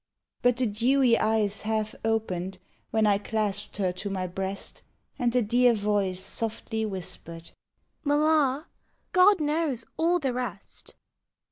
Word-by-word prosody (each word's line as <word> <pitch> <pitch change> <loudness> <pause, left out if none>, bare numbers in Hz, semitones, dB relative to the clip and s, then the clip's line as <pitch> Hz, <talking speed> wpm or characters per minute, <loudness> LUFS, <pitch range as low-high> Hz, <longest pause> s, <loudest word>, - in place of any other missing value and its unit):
But 245 -1 +3
the 255 - +2
dewy 240 +3 +3
eyes 215 -2 +2
half 215 0 -1
opened 190 -5 -1 0.3
When 220 -1 +2
I 200 -1 +3
clasped 210 -1 -2
her 190 -3 +1
to 190 +3 -5
my 190 -2 -2
breast, 190 +2 -4 0.4
And 240 -1 +2
the 250 0 +2
dear 240 +2 +4
voice 200 -3 0
softly 225 0 -2
whispered, 170 -3 -4 0.3
" - - -47
Mamma, 295 -1 +2 0.5
God 375 +1 +6
knows 300 -4 0
all 340 +2 +3
the 270 -7 -1
rest." 240 -7 -6
220 Hz, 135 wpm, -27 LUFS, 200-255 Hz, 0.5 s, God